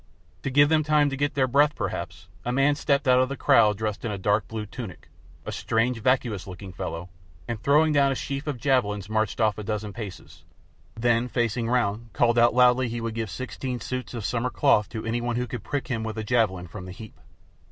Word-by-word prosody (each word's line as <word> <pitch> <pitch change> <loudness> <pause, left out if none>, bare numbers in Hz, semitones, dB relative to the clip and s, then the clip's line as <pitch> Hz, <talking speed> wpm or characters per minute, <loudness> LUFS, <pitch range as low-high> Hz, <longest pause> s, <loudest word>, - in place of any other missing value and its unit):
To - - -2
give 145 +2 +5
them 160 -1 +3
time 150 -1 +3
to - - -2
get 145 +1 -1
their 135 -2 +3
breath, 145 +3 +3
perhaps, - - -5 0.2
a 120 - -2
man 135 +3 +3
stepped 140 -1 0
out 125 0 +6
of 130 0 +2
the 140 - -4
crowd 105 -3 +4
dressed 105 -1 -3
in 115 - -2
a 100 - -3
dark 100 +2 +1
blue 110 -1 -5
tunic, 105 -4 -9 0.4
a - - -4
strange 115 +1 0
vacuous 120 -6 0
looking 95 0 -9
fellow, 85 0 -5 0.4
and 115 -2 -4
throwing 150 +2 +4
down 140 -1 +4
a - - -1
sheaf 140 +3 -4
of 145 -4 -2
javelins 110 -6 0
marched 110 -1 0
off 110 -2 +2
a - - -5
dozen 105 -1 -3
paces, 100 -7 -9 0.5
then, 120 +1 +2
facing 120 -1 -1
round, 115 -2 0
called 120 -1 +3
out 120 +1 +4
loudly 125 0 +5
he 120 +1 -3
would 115 -1 -3
give 110 -1 -3
sixteen 130 +4 -5
suits 125 +2 -5
of 115 -4 -4
"summer 125 +1 -1
cloth" 125 -6 +3
to 110 -2 -6
any 115 +1 -1
one 120 0 -2
who 125 +1 -1
could 120 -1 -6
prick 145 -2 -3
him 115 -3 -2
with 110 0 -5
a 110 - -2
javelin 105 -6 +1
from 90 +2 -9
the 90 - -8
heap. 110 +4 -11
120 Hz, 225 wpm, -25 LUFS, 105-130 Hz, 0.5 s, out